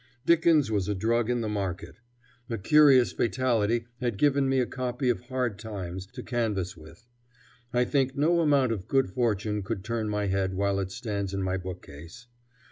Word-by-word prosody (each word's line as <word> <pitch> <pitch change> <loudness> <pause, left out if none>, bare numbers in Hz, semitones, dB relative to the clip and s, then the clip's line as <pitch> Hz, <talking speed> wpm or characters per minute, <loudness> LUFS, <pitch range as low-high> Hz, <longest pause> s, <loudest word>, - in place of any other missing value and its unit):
Dickens 165 -6 +4
was 100 -3 0
a 105 - 0
drug 115 +4 +1
in 120 -1 0
the 110 - -2
market. 100 0 -4 0.5
A 115 - -2
curious 135 +3 +5
fatality 115 -2 0
had 120 -5 -2
given 140 +2 +2
me 135 - +2
a 125 - +2
copy 125 +1 -2
of 120 - +1
"Hard 125 -4 -3
Times" 95 -4 -6
to 125 +3 -9
canvass 105 -7 -2
with. 80 +9 -15 0.7
I 125 0 +2
think 135 0 0
no 165 +4 +3
amount 140 -6 +3
of 100 -5 -4
good 135 -7 +1
fortune 105 -2 0
could 100 -1 -4
turn 110 0 -2
my 105 -1 -1
head 95 -1 -1
while 100 0 0
it 95 -1 -3
stands 100 -2 -4
in 95 - -2
my 95 0 -1
bookcase. 90 - -9
115 Hz, 180 wpm, -27 LUFS, 95-125 Hz, 0.7 s, curious